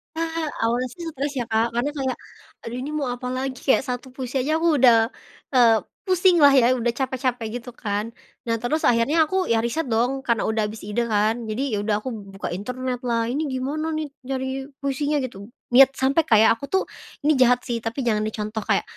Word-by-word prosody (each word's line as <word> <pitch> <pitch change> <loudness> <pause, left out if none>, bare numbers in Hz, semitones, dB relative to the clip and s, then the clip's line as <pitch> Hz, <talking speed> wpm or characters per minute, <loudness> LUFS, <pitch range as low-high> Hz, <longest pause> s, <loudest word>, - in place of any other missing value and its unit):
Nah 325 0 -2 0.2
awalnya 240 +3 +1
sih 345 - -9
stres 285 0 -3
ya - - 0
Kak 225 +1 +2
karena 245 +5 0
kayak, 265 -2 -1 0.5
aduh 235 +2 -6
ini 285 - -5
mau 275 -4 -1
apalagi 255 +1 -3
kayak 265 - +4
1 245 +1 -4
puisi 260 0 -6
aja 310 - 0
aku 330 -3 +3
udah, 235 -3 +5 0.4
eee, 230 -4 +5 0.2
pusing 370 -1 +4
lah 280 -1 +8
ya 255 -3 +5
udah 240 0 0
capek-capek 255 -3 -1
gitu 245 +1 -10
kan, 205 -2 -2 0.4
nah 230 - 0
terus 300 +6 -1
akhirnya 260 +8 +3
aku 370 +3 -1
ya 230 - +2
riset 255 +5 -1
dong 245 +4 +1
karena 235 -2 +2
udah 220 -1 0
habis 215 +1 -8
ide 210 +4 -1
kan, 215 0 +2
jadi 215 +4 -2
ya - - +1
udah 210 0 +1
aku 260 - -3 0.3
buka 195 - -4
internetlah 245 +3 -2
ini 285 - -1
gimana 280 +5 -2
nih 310 -1 -3 0.2
nyari 265 0 -3 0.2
puisinya 290 +2 0
gitu, 200 -5 -7 0.3
niat 265 +1 +8
sampai 270 +5 +2
kayak 220 0 +6
aku 280 - -5
tuh 380 - +4 0.4
ini 305 - +4
jahat 250 -1 +5
sih 240 - -1
tapi 230 +4 -4
jangan 215 -2 +2
dicontoh 215 0 -4
kayak, - - +3
250 Hz, 195 wpm, -23 LUFS, 230-275 Hz, 0.5 s, lah